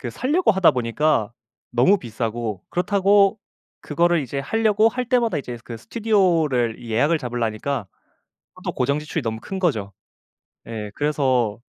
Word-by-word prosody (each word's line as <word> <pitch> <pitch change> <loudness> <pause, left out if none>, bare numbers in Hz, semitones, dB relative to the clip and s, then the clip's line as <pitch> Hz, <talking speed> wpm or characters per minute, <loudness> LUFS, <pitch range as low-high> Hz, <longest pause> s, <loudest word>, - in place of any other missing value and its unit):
그 125 - -5
사려고 280 - +1
하다 190 -4 +5
보니까 120 -2 0 0.4
너무 130 +12 +4
비싸고 115 - -4
그렇다고 200 +2 +3 0.4
그거를 170 +2 +2
이제 135 +2 -5
하려고 220 +7 +2
할 250 +2 -3
때마다 240 - +1
이제 125 -4 -5
그 115 -2 -7
스튜디오를 165 - +1
예약을 125 +8 +1
잡으려니까 120 -1 -3 0.7
하도 - - -5
고정 140 +4 0
지출이 150 0 -4
너무 110 -1 -3
큰 195 - -6
거죠. 110 - -1 0.7
예 105 -3 -6
그래서 130 -7 0
140 Hz, 320 characters per minute, -22 LUFS, 115-190 Hz, 0.7 s, 하다